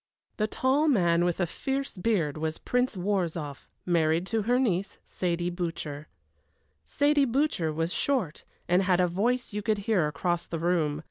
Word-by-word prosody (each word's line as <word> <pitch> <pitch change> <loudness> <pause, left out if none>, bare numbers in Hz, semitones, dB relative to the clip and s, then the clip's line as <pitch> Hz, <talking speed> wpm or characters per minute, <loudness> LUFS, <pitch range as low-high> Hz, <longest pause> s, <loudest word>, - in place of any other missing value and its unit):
The 215 - +1
tall 265 +7 +1
man 175 - +3
with 175 -1 0
the 180 - +1
fierce 270 - -3
beard 180 -7 0
was 160 0 -3
Prince 250 -4 0
Worrzoff, 175 -7 -2 0.2
married 165 -1 +2
to 225 - +2
her 240 +4 +2
niece, 200 -7 0
Saidie 175 -1 -2
Butcher. 155 -4 -4 0.8
Saidie 285 -3 +2
Butcher 255 - +1
was 165 +3 -2
short, 240 - -1 0.2
and 180 +2 +4
had 185 -2 +2
a 180 - +4
voice 225 +7 0
you 210 - -2
could 215 0 +1
hear 190 -9 +2
across 175 +3 -2
the 165 - -3
room. 160 -3 0
180 Hz, 160 wpm, -28 LUFS, 165-230 Hz, 0.8 s, and